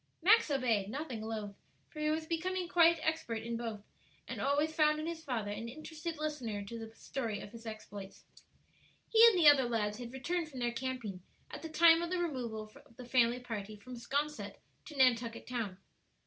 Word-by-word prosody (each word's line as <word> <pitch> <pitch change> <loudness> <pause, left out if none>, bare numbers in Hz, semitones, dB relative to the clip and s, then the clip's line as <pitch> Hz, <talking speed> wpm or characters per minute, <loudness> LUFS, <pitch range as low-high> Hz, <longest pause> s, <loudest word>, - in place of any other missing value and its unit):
Max 425 0 +6
obeyed, 235 -8 +1
nothing 265 -2 -4
loath, 215 -2 -4 0.4
for 305 - -9
he 305 0 +1
was 315 +1 0
becoming 355 +3 -2
quite 335 -1 +5
expert 280 -9 -1
in 235 0 -3
both, 225 -3 -4 0.5
and - - -5
always 290 +3 +1
found 305 -1 +3
in 310 - -3
his 330 -1 -4
father 225 -7 -2
an 230 +3 -5
interested 310 +4 -6
listener 255 -10 -3
to 230 +3 -7
the 225 0 -7
story 225 -6 -4
of 200 - -9
his 230 0 -10
exploits. 205 -3 -9 0.8
He 450 0 +6
and 440 -5 +5
the 330 -4 +6
other 270 -4 +7
lads 210 -2 -1
had 240 -1 -6
returned 320 +5 -2
from 265 -4 -8
their 240 -1 0
camping 235 -6 -4 0.3
at - - -7
the 325 - -6
time 330 +1 +6
of 340 - -2
the 365 - 0
removal 240 -10 -3
of 230 - -23
the 250 - -8
family 240 0 +3
party 215 -4 -5
from 250 +5 -11
'Sconset 285 +5 -2 0.3
to 295 - -10
Nantucket 235 -3 +3
Town. 225 -7 -3
255 Hz, 190 wpm, -33 LUFS, 225-315 Hz, 0.8 s, other